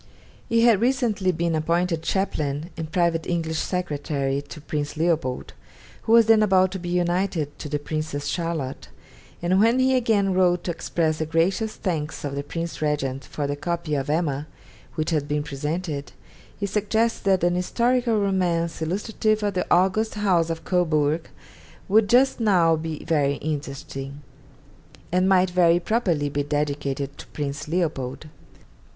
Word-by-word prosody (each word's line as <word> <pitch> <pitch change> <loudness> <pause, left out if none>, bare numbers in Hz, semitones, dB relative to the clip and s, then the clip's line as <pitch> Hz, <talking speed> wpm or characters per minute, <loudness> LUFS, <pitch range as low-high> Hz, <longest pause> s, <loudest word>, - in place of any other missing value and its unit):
He 230 0 +3
had 230 -4 +5
recently 235 -7 +1
been 170 0 -1
appointed 165 +1 0
chaplain 160 -4 -2
and 160 -1 -6
private 170 -2 +1
English 160 -2 -1
secretary 145 -6 -2
to 145 +2 -11
Prince 145 0 -4
Leopold, 160 -6 -1 0.5
who 225 - +1
was 230 -1 +7
then 220 0 +5
about 190 -3 +4
to 190 - -4
be 175 0 -5
united 175 -3 0
to 150 - -6
the 150 - 0
Princess 150 -1 -4
Charlotte; 165 -6 -3 0.6
and 185 +2 +3
when 230 +4 +4
he 260 0 +3
again 215 -6 +2
wrote 180 -1 +3
to 175 - -1
express 160 -1 -1
the 160 - -1
gracious 185 +7 +1
thanks 160 -5 -3
of 145 -1 -3
the 140 - -2
Prince 165 +3 -5
Regent 135 -3 -1
for 145 - -4
the 145 0 -1
copy 170 +1 -3
of 140 -1 -1
'Emma' 150 -2 0 0.5
which 155 0 -1
had 150 -3 0
been 150 0 -1
presented, 150 +1 -4 0.5
he 200 - -1
suggests 215 +3 0
that 190 -3 +2
'an 175 0 +3
historical 235 +5 +1
romance 175 -5 0
illustrative 210 +5 0
of 205 -1 0
the 180 - -1
august 190 +5 +2
House 185 -6 +2
of 165 0 -4
Cobourg 160 -3 +1 0.6
would 210 +1 +4
just 255 +2 +4
now 180 -7 +4
be 160 -1 -5
very 145 -3 +2
interesting,' 140 -2 -5 0.9
and 185 +2 +2
might 185 -1 +4
very 175 -1 +4
properly 175 -7 0
be 145 0 -1
dedicated 145 -1 -2
to - - -10
Prince 145 0 -5
Leopold. 150 -5 -2
170 Hz, 155 wpm, -24 LUFS, 150-190 Hz, 0.9 s, was